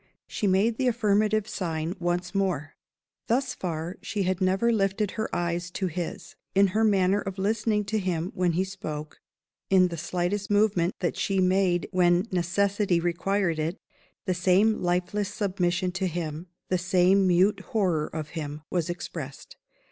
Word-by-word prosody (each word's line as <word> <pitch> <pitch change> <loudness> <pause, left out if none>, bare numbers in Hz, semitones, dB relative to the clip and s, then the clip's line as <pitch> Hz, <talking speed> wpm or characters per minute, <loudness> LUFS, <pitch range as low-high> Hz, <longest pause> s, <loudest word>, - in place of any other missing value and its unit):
She 205 - -2
made 200 +5 +2
the 260 - +1
affirmative 215 -2 +2
sign 165 -3 -3
once 175 +1 -1
more. 180 -7 -1 0.5
Thus 260 +3 +1
far, 170 +1 -4
she 205 -2 -2
had 185 0 -1
never 190 +5 +2
lifted 195 -1 0
her 220 0 -3
eyes 175 0 -2
to 190 - -2
his. 175 -1 -5 0.2
In 195 0 +5
her 220 +4 +1
manner 200 -1 +3
of 195 0 -5
listening 210 +1 0
to 215 +2 -1
him 180 -2 -2
when 180 -2 +1
he 180 +3 +1
spoke, 155 -5 -6 0.5
in 185 -2 +5
the 170 - -5
slightest 180 +5 -2
movement 205 -4 +2
that 175 - 0
she 195 -1 0
made 185 -1 +2
when 180 0 +3
necessity 185 +1 +1
required 175 0 0
it, 160 +4 -2 0.5
the 185 - +1
same 190 +4 +3
lifeless 180 +3 0
submission 180 -3 0
to 190 +1 -1
him, 165 -1 -4 0.2
the 185 - +1
same 185 +2 +3
mute 185 +3 +3
horror 180 -8 0
of 155 -1 -6
him, 150 -2 -6
was 175 -2 0
expressed. 165 -5 -7
185 Hz, 155 wpm, -27 LUFS, 175-200 Hz, 0.5 s, In